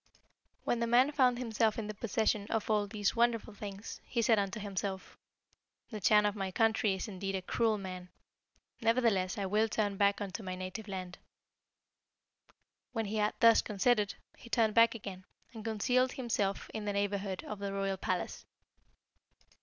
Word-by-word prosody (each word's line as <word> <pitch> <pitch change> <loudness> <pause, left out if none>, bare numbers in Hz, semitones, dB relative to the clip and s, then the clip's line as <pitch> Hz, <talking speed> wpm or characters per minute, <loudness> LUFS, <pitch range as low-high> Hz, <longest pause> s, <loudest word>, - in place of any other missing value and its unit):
"When 240 - 0
the 235 - 0
man 250 +5 +5
found 255 -4 +3
himself 225 -3 +1
in 225 - -3
the 215 - -5
possession 215 -1 0
of 225 0 -1
all 210 -1 +2
these 205 -1 -1
wonderful 230 -2 +1
things, 200 0 -8
he 235 -2 -1
said 225 -1 +4
unto 200 +1 -2
himself, 195 -1 -4 0.8
'The 215 -2 -5
Chan 210 +3 +5
of 205 0 +1
my 195 -2 -2
country 215 0 +2
is 190 - -4
indeed 195 -1 -4
a 190 - -2
cruel 220 +2 +1
man; 185 -2 -7 0.7
nevertheless 225 -6 +2
I 200 - -1
will 215 +3 +2
turn 205 -2 -1
back 200 0 +3
unto 205 +1 -5
my 185 -2 -4
native 185 +4 -6
land.' 185 -2 -6 1.7
When 225 -2 -1
he 210 +2 -3
had 210 0 +1
thus 230 -1 +7
considered, 210 0 +1 0.2
he 235 - -13
turned 225 -3 +2
back 230 +1 +5
again, 195 -4 -7 0.3
and 220 -2 -8
concealed 245 +4 +1
himself 215 -6 -2
in 215 -1 -4
the 205 - -1
neighbourhood 200 -1 -2
of 210 - -6
the 200 -1 -3
royal 195 -1 -1
palace. 185 -1 -3
210 Hz, 170 wpm, -32 LUFS, 195-225 Hz, 1.7 s, thus